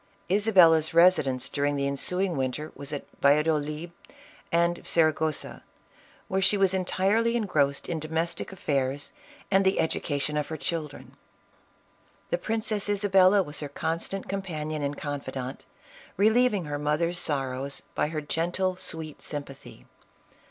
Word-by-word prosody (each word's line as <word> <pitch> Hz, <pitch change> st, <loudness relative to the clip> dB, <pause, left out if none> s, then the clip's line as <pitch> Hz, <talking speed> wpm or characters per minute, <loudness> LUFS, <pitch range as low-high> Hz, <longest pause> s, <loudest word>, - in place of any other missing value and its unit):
Isabella's 180 Hz, -7 st, +5 dB
residence 160 Hz, -8 st, +4 dB
during 145 Hz, 0 st, 0 dB
the 140 Hz, 0 st, -1 dB
ensuing 180 Hz, +6 st, 0 dB
winter 135 Hz, +3 st, -3 dB
was 140 Hz, +1 st, -5 dB
at 145 Hz, -, -4 dB
Valladolid 150 Hz, +2 st, +2 dB, 0.6 s
and 170 Hz, +1 st, +2 dB
Saragossa, 155 Hz, -2 st, 0 dB, 0.7 s
where 190 Hz, +1 st, 0 dB
she 205 Hz, +2 st, +4 dB
was 195 Hz, -1 st, +3 dB
entirely 195 Hz, +5 st, +1 dB
en 230 Hz, -3 st, 0 dB
grossed 140 Hz, -6 st, 0 dB
in 165 Hz, -2 st, -2 dB
domestic 160 Hz, +3 st, -2 dB
affairs 140 Hz, -6 st, -2 dB, 0.4 s
and 195 Hz, 0 st, +4 dB
the 190 Hz, 0 st, +2 dB
education 150 Hz, -2 st, 0 dB
of 150 Hz, -, -1 dB
her 160 Hz, -, -5 dB
children. 160 Hz, -3 st, -5 dB, 1.2 s
The -, -, +1 dB
Princess 215 Hz, -2 st, -2 dB
Isabella 195 Hz, -1 st, +4 dB
was 150 Hz, -2 st, -5 dB
her 145 Hz, -, -4 dB
constant 165 Hz, +6 st, -3 dB
com 195 Hz, 0 st, -2 dB
panion 155 Hz, -4 st, -4 dB
and 140 Hz, 0 st, -2 dB
confidant, 140 Hz, -2 st, -5 dB, 0.5 s
relieving 220 Hz, -2 st, +3 dB
her 145 Hz, -1 st, -3 dB
mother's 160 Hz, +4 st, 0 dB
sorrows 135 Hz, -1 st, -2 dB
by -, -, 0 dB
her 155 Hz, 0 st, -3 dB
gentle, 175 Hz, +5 st, -1 dB
sweet 160 Hz, -4 st, -6 dB
sympathy. 140 Hz, -2 st, -8 dB
160 Hz, 130 wpm, -27 LUFS, 145-190 Hz, 1.2 s, Isabella's